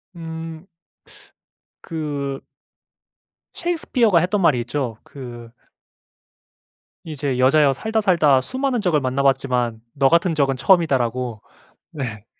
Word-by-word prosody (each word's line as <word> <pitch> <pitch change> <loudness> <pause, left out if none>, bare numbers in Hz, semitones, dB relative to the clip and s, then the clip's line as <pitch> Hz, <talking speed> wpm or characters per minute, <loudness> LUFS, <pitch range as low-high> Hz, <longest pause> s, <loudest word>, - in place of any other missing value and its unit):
음 165 0 -7 1.2
그 145 -5 -4 1.1
셰익스피어가 255 - +1
했던 190 +4 0
말이 150 -8 +3
있죠. 120 -3 -3
그 120 -4 -10 1.5
이제 145 -5 -3
"여자여 140 +2 +4
살다 220 - -2
살다 160 -10 +4
수많은 260 - -2
적을 175 -8 +2
만나봤지만 130 -3 0
너 135 -1 +3
같은 170 +1 +3
적은 135 -2 +1
처음이다."라고 130 - +1 0.5
네. 120 -9 -6
145 Hz, 225 characters per minute, -21 LUFS, 130-170 Hz, 1.5 s, 여자여